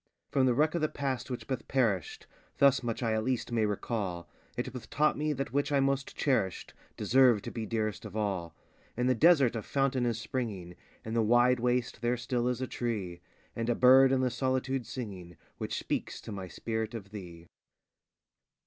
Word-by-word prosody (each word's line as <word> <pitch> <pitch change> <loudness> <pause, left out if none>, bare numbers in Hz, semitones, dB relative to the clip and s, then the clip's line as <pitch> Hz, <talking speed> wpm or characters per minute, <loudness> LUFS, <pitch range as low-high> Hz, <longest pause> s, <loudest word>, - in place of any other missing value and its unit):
_ - - -44
From 130 -2 +4
the 125 - +3
wreck 155 +4 +3
of 170 - -1
the 155 - +1
past, 135 -3 -3
which 125 - -5
bath 130 -3 -4
perished, 110 - 0 0.3
Thus 140 -1 +5
much 120 0 -3
I 115 -1 +1
at 110 0 0
least 125 0 -1
may 110 -2 +2
recall, 100 -5 -3 0.3
It - - -3
bath - - -8
taught 150 +1 +2
me 150 +1 -1
that 135 -3 -4
which 145 +1 0
I 140 - +3
most 135 0 0
cherished 100 -10 0 0.2
Deserved 125 -5 +4
to - - -5
be 110 -2 -4
dearest 110 -3 -2
of 105 -2 -9
all: 95 -6 -2 0.4
In 125 - +1
the 130 - +4
desert 140 -3 +5
a 115 - -2
fountain 135 +1 0
is 115 -2 0
springing, 105 -8 -4 0.3
In 110 - -4
the 115 - +2
wide 120 +3 +4
waste 125 -1 0
there 120 +1 +1
still 120 0 -1
is 125 0 -1
a - - -2
tree, 100 -10 -3 0.3
And 115 +1 -2
a 120 - +2
bird 130 +2 +7
in 130 -1 +2
the 125 -1 +1
solitude 130 0 -1
singing, 95 - -7 0.2
Which - - -3
speaks - - -3
to - - -8
my 95 -2 -5
spirit 110 +5 -4
of 100 -3 -8
_thee. 85 -5 -9
120 Hz, 200 wpm, -30 LUFS, 110-130 Hz, 0.4 s, bird